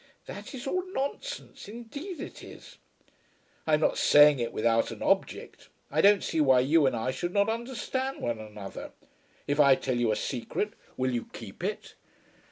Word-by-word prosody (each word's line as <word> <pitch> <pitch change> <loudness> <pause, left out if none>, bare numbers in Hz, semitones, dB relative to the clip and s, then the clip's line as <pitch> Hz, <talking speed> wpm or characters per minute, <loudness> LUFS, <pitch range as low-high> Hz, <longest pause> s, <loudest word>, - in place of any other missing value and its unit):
"That - - -8
is 260 +2 -7
all 365 +7 -1
nonsense. 280 - -5
Indeed 280 - -8
it - - -8
is." - - -13 0.9
"I 155 - +5
am 150 - -2
not - - +2
saying 145 -2 +7
it 120 -1 -2
without 115 +1 +1
an - - -7
object. - - -1 0.2
I 155 +3 +2
don't 200 +1 +5
see 160 - 0
why 130 -3 +5
you 145 +2 +4
and 130 - 0
I 115 +3 -1
should 175 +6 -4
not 200 +1 +3
understand 260 +3 -3
one 120 -2 -2
another. 105 -2 -9 0.5
If 145 +1 -1
I 140 -2 +7
tell 130 -1 -2
you 120 -2 +2
a - - +1
secret 135 - -3 0.2
will 130 0 0
you 120 -2 -3
keep - - -10
it?" - - -4
150 Hz, 175 wpm, -28 LUFS, -, 0.9 s, saying